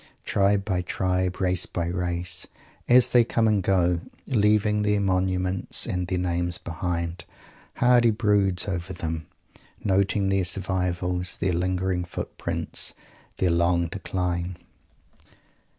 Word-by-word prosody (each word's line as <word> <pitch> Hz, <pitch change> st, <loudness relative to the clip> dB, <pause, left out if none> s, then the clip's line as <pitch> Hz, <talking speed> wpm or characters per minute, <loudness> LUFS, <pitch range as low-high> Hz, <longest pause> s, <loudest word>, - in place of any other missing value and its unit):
Tribe 100 Hz, 0 st, +2 dB
by 95 Hz, -3 st, 0 dB
tribe, 90 Hz, 0 st, -1 dB
race 90 Hz, -2 st, +2 dB
by 85 Hz, -, -3 dB
race, 90 Hz, 0 st, -2 dB, 0.4 s
as 125 Hz, 0 st, +6 dB
they 120 Hz, -1 st, +6 dB
come 115 Hz, -1 st, +1 dB
and 105 Hz, -2 st, +2 dB
go, 90 Hz, -2 st, +1 dB, 0.2 s
leaving 105 Hz, -3 st, +2 dB
their 105 Hz, 0 st, +1 dB
monuments 95 Hz, -1 st, +1 dB
and 90 Hz, -1 st, -2 dB
their 90 Hz, -, -1 dB
names 90 Hz, 0 st, -1 dB
behind, 85 Hz, 0 st, -3 dB, 0.6 s
Mr. -, -, -16 dB
Hardy 120 Hz, -1 st, +5 dB
broods 105 Hz, -4 st, +2 dB
over 95 Hz, -1 st, -3 dB
them, 80 Hz, -2 st, -4 dB, 0.6 s
noting 100 Hz, 0 st, +1 dB
their 95 Hz, -1 st, +2 dB
survivals, 90 Hz, -1 st, -1 dB
their 95 Hz, -1 st, 0 dB
lingering 90 Hz, +1 st, -1 dB
footprints, 85 Hz, -, -3 dB, 0.4 s
their 90 Hz, -2 st, +2 dB
long 85 Hz, 0 st, +2 dB
decline. 90 Hz, -2 st, -3 dB
95 Hz, 120 wpm, -25 LUFS, 90-100 Hz, 0.6 s, as